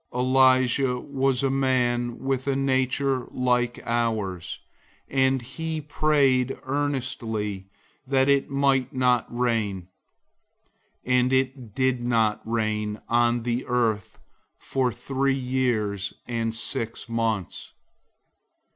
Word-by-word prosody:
005:017 125 Hz, -, -3 dB
Elijah 130 Hz, 0 st, +3 dB
was 135 Hz, -1 st, 0 dB
a 135 Hz, -, +2 dB
man 120 Hz, -3 st, +1 dB
with 135 Hz, 0 st, -2 dB
a 135 Hz, -, +1 dB
nature 130 Hz, -1 st, 0 dB
like 125 Hz, -1 st, 0 dB
ours, 110 Hz, -7 st, -1 dB, 0.5 s
and 130 Hz, -1 st, +2 dB
he 160 Hz, +5 st, -4 dB
prayed 140 Hz, -4 st, +2 dB
earnestly 120 Hz, -8 st, -2 dB, 0.4 s
that 135 Hz, 0 st, +3 dB
it 140 Hz, -1 st, +3 dB
might 135 Hz, -2 st, +2 dB
not 125 Hz, -2 st, +2 dB
rain, 110 Hz, -7 st, -1 dB, 1.2 s
and 125 Hz, 0 st, +2 dB
it 130 Hz, -4 st, -1 dB
didn't 120 Hz, -4 st, +1 dB
rain 110 Hz, -2 st, -1 dB
on 120 Hz, 0 st, +2 dB
the 120 Hz, +1 st, -1 dB
earth 115 Hz, -5 st, 0 dB, 0.4 s
for 130 Hz, -2 st, -1 dB
three 135 Hz, +3 st, -1 dB
years 120 Hz, -6 st, -1 dB
and 115 Hz, -2 st, -2 dB
six 115 Hz, 0 st, -3 dB
months. 115 Hz, -5 st, -2 dB
125 Hz, 100 wpm, -25 LUFS, 115-135 Hz, 1.2 s, Elijah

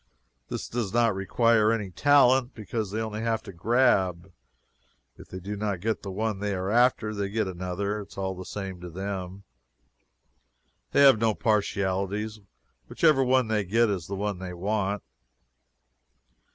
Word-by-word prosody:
This -, -, -4 dB
does 115 Hz, -5 st, -3 dB
not 115 Hz, -2 st, +3 dB
require 110 Hz, +3 st, +2 dB
any 105 Hz, -4 st, -2 dB
talent, 130 Hz, +1 st, +4 dB
because 110 Hz, -1 st, -4 dB
they 105 Hz, +3 st, -3 dB
only 110 Hz, -1 st, -3 dB
have 115 Hz, -1 st, -1 dB
to 100 Hz, -, -10 dB
grab 95 Hz, -3 st, +1 dB, 0.8 s
if -, -, -14 dB
they 95 Hz, -, -7 dB
do 100 Hz, +3 st, -5 dB
not 100 Hz, -2 st, -2 dB
get 110 Hz, +4 st, -2 dB
the 100 Hz, -, -7 dB
one 105 Hz, +1 st, -2 dB
they 100 Hz, -1 st, -2 dB
are 95 Hz, +2 st, -2 dB
after, 120 Hz, -2 st, +3 dB
they 100 Hz, -2 st, -2 dB
get 110 Hz, +1 st, 0 dB
another. 95 Hz, +3 st, -3 dB
It 100 Hz, -, -10 dB
is -, -, -16 dB
all 95 Hz, -1 st, -2 dB
the 95 Hz, 0 st, -8 dB
same 95 Hz, -2 st, -6 dB
to 90 Hz, -, -7 dB
them. 95 Hz, +1 st, -5 dB, 1.5 s
They -, -, +4 dB
have 135 Hz, -6 st, +7 dB
no 110 Hz, -2 st, +2 dB
partialities. 100 Hz, 0 st, -1 dB, 0.5 s
Whichever 155 Hz, -5 st, +3 dB
one 130 Hz, -1 st, +3 dB
they 110 Hz, -2 st, 0 dB
get 110 Hz, +4 st, +2 dB
is 90 Hz, -5 st, -3 dB
the 100 Hz, -, -4 dB
one 100 Hz, -1 st, -3 dB
they 90 Hz, -1 st, -6 dB
want. 100 Hz, +1 st, -1 dB
105 Hz, 165 wpm, -27 LUFS, 95-115 Hz, 1.5 s, have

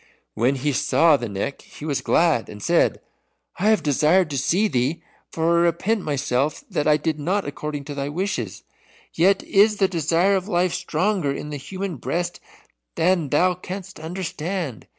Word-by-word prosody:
When 125 Hz, +5 st, +1 dB
he 140 Hz, +3 st, -1 dB
saw 160 Hz, +4 st, +4 dB
the 120 Hz, -5 st, -3 dB
Neck 100 Hz, +8 st, -4 dB
he 150 Hz, -, -11 dB
was 145 Hz, -3 st, -1 dB
glad, 160 Hz, -9 st, +2 dB
and 105 Hz, -, -9 dB
said, -, -, +2 dB, 0.6 s
"I 205 Hz, +4 st, +3 dB
have 220 Hz, -2 st, +3 dB
desired 155 Hz, +4 st, +3 dB
to 140 Hz, -, -2 dB
see 190 Hz, +11 st, +2 dB
thee, 130 Hz, 0 st, -1 dB, 0.3 s
for 165 Hz, +1 st, +2 dB
I 170 Hz, -, +4 dB
repent 190 Hz, +6 st, +1 dB
myself 140 Hz, -2 st, -1 dB
that 150 Hz, -, 0 dB
I 150 Hz, -1 st, +5 dB
did 155 Hz, -1 st, -2 dB
not 190 Hz, +7 st, 0 dB
according 145 Hz, 0 st, -5 dB
to 145 Hz, +1 st, -7 dB
thy 140 Hz, 0 st, -3 dB
wishes. 150 Hz, -, -3 dB, 0.5 s
Yet 190 Hz, +4 st, +3 dB
is 210 Hz, +2 st, +4 dB
the 195 Hz, -, +3 dB
desire 170 Hz, +3 st, +2 dB
of 190 Hz, 0 st, -2 dB
life 180 Hz, -3 st, +1 dB
stronger 180 Hz, -2 st, 0 dB
in 150 Hz, +2 st, -5 dB
the 145 Hz, -, -4 dB
human 185 Hz, +4 st, -5 dB
breast 170 Hz, +8 st, -3 dB, 0.6 s
than 170 Hz, -3 st, +2 dB
thou 180 Hz, +6 st, +3 dB
canst 185 Hz, 0 st, -8 dB
understand. 165 Hz, -, -4 dB
165 Hz, 170 wpm, -23 LUFS, 145-185 Hz, 0.6 s, I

